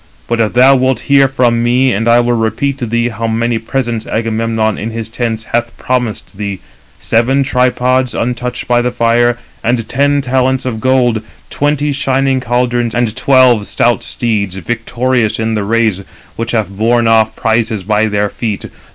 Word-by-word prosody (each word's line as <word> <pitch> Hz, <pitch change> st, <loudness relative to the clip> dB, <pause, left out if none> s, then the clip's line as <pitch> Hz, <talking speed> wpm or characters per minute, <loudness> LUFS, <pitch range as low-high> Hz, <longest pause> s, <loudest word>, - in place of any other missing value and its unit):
But 120 Hz, 0 st, -1 dB
if 110 Hz, -2 st, +1 dB
[thou 130 Hz, +3 st, +6 dB
wilt] 130 Hz, -2 st, 0 dB
hear 140 Hz, -1 st, +4 dB
from 120 Hz, -3 st, +1 dB
me, 125 Hz, +2 st, +2 dB
and 115 Hz, +4 st, -1 dB
I 120 Hz, +1 st, +5 dB
will 120 Hz, 0 st, 0 dB
repeat 125 Hz, +5 st, -1 dB
to 120 Hz, -, -3 dB
thee 120 Hz, +2 st, 0 dB
how 115 Hz, 0 st, -4 dB
many 115 Hz, +1 st, 0 dB
presents 115 Hz, -1 st, -3 dB
Agamemnon 110 Hz, -1 st, -1 dB
in 110 Hz, -, -4 dB
his 115 Hz, -1 st, -5 dB
tents 115 Hz, -1 st, -3 dB
hath 120 Hz, 0 st, -1 dB
promised 110 Hz, -5 st, -3 dB
thee: 100 Hz, -2 st, -4 dB, 0.4 s
seven 125 Hz, +5 st, +1 dB
tripods, 125 Hz, 0 st, +1 dB
untouched 125 Hz, +1 st, -3 dB
by 120 Hz, 0 st, +3 dB
the 125 Hz, -, 0 dB
fire, 120 Hz, 0 st, +2 dB, 0.3 s
and 115 Hz, -1 st, 0 dB
ten 140 Hz, +3 st, +1 dB
talents 130 Hz, 0 st, 0 dB
of 115 Hz, -4 st, -3 dB
gold, 125 Hz, -3 st, +2 dB, 0.3 s
twenty 145 Hz, 0 st, 0 dB
shining 135 Hz, -1 st, 0 dB
caldrons, 120 Hz, -1 st, -1 dB
and 120 Hz, -2 st, 0 dB
twelve 130 Hz, -5 st, +3 dB
stout 120 Hz, 0 st, +1 dB
steeds, 105 Hz, -6 st, -2 dB
victorious 120 Hz, +4 st, -1 dB
in 110 Hz, 0 st, -1 dB
the 105 Hz, -2 st, -1 dB
race, 110 Hz, -2 st, +1 dB, 0.3 s
which 115 Hz, 0 st, -4 dB
have 105 Hz, -4 st, -1 dB
borne 115 Hz, +3 st, +2 dB
off 110 Hz, -1 st, +3 dB
prizes 110 Hz, -3 st, 0 dB
by 105 Hz, +2 st, +1 dB
their 105 Hz, -1 st, 0 dB
feet. 105 Hz, 0 st, -4 dB
120 Hz, 170 wpm, -13 LUFS, 110-125 Hz, 0.4 s, thou